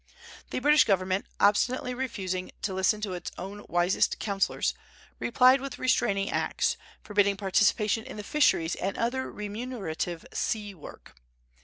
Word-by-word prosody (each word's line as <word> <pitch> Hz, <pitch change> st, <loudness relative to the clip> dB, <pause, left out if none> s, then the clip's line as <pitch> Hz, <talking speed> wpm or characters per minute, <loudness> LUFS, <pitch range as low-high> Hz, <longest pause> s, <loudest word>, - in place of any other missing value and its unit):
The -, -, -3 dB
British 295 Hz, +3 st, +5 dB
Government, 190 Hz, -1 st, +1 dB
obstinately 250 Hz, +5 st, +2 dB
refusing 195 Hz, -8 st, -3 dB
to 195 Hz, -, -1 dB
listen 190 Hz, +3 st, +1 dB
to 200 Hz, -3 st, -3 dB
its 175 Hz, -1 st, -5 dB
own 200 Hz, +3 st, -7 dB
wisest 175 Hz, +2 st, +2 dB
counsellors, 200 Hz, -2 st, 0 dB, 0.5 s
replied 255 Hz, +2 st, +5 dB
with 275 Hz, -1 st, -6 dB
restraining 200 Hz, -6 st, +1 dB
acts, -, -, 0 dB, 0.3 s
forbidding 200 Hz, -1 st, +2 dB
participation 210 Hz, +2 st, +2 dB
in -, -, -8 dB
the 210 Hz, -, -5 dB
fisheries 200 Hz, -, +2 dB
and 195 Hz, +1 st, -3 dB
other 250 Hz, +3 st, -1 dB
remunerative 205 Hz, -6 st, -4 dB
sea 210 Hz, -3 st, -2 dB
work. 160 Hz, -6 st, -13 dB
205 Hz, 135 wpm, -28 LUFS, 190-240 Hz, 0.5 s, British